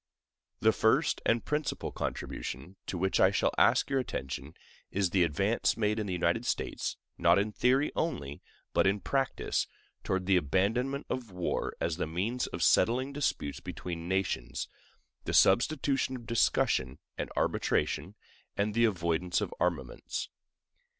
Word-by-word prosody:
The - - +6
first - - +2
and 115 0 +2
principal 150 -1 -2
contribution 70 +10 -5
to 95 - -3
which 95 +2 +1
I 95 - +7
shall 95 - +1
ask - - +4
your 135 -1 +1
attention 70 - -5 0.3
is 95 -3 0
the 95 - +3
advance 95 +8 +1
made 105 0 +1
in 105 - -2
the - - -3
United 90 +5 +1
States, 120 - -2 0.2
not 85 +1 +5
in 105 +2 +1
theory 130 +6 +2
only, 75 - -2 0.3
but - - +4
in 100 +2 +2
practice, 135 +4 -1 0.4
toward 95 -1 -1
the 95 -1 +4
abandonment 115 - 0
of 125 -3 -4
war 90 -2 -2
as 85 -1 -1
the 90 - -1
means 105 +10 -1
of - - -3
settling 130 +4 +3
disputes 135 - -1
between 85 -1 -6
nations, 95 0 -1 0.6
the - - -1
substitution 135 -1 +3
of 120 -2 -8
discussion 65 - +1 0.2
and - - -4
arbitration, - - 0 0.4
and 105 +1 +1
the 115 +2 +4
avoidance 90 -3 0
of - - -3
armaments. - - -2
100 Hz, 145 wpm, -30 LUFS, 85-125 Hz, 0.6 s, I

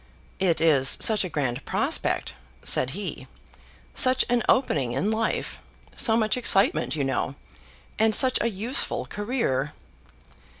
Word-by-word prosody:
"It 180 -4 +1
is 145 -5 +4
such 215 -3 +3
a 185 - -5
grand 130 -7 -3
prospect," - - -1 0.3
said 130 - +2
he. 205 - -7 0.7
"Such 255 0 +2
an 245 -1 +2
opening 145 - +1
in 190 - -1
life. 220 0 -3 0.4
So 225 -2 +3
much 215 +1 +1
excitement, 195 -8 +2
you 145 - -2
know; 135 0 -2 0.6
and 220 -1 +4
such 260 -1 +4
a 235 - 0
useful 230 +6 -1
career." 205 - -3
205 Hz, 130 wpm, -24 LUFS, 140-230 Hz, 0.7 s, is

